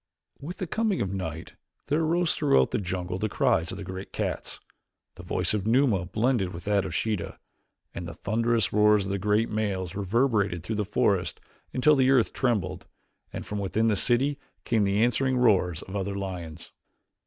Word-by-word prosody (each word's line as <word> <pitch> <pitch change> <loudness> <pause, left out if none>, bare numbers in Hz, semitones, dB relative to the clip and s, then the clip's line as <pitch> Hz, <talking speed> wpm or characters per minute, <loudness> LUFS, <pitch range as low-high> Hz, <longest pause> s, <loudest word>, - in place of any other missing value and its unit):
With 165 +6 -7
the 185 - -3
coming 220 +2 0
of 100 -1 -2
night 80 -4 -5 0.3
there 150 +3 +1
arose 165 +1 +1
throughout 140 - +3
the - - 0
jungle 90 -1 -3
the 110 - -1
cries 80 -3 +1
of 95 - -6
the 100 - -6
great 95 +1 -7
cats, - - -4 0.5
the - - -11
voice - - -1
of 105 -1 -1
Numa 115 -7 +3
blended 110 -4 0
with 85 - -8
that 100 -1 +1
of - - -4
Sheeta, 105 -6 -2 0.6
and 85 - -6
the 85 - -8
thunderous 115 +2 0
roars 105 -1 +4
of 95 - -3
the 100 - -1
great 105 +3 +1
males 100 -5 -2
reverberated 100 -3 +1
through 110 - -3
the 105 - 0
forest 100 -2 0 0.3
until 150 +4 +4
the 130 -1 +3
earth 130 -4 +3
trembled, 95 -8 -1 0.4
and - - -6
from 105 - -4
within 110 +3 +1
the 105 - +2
city 130 +8 +1 0.3
came 110 -4 +2
the 100 +3 +2
answering 130 +2 +1
roars 95 -9 +2
of 95 - -9
other 100 0 -2
lions. 85 -5 -6
105 Hz, 185 wpm, -27 LUFS, 95-120 Hz, 0.6 s, roars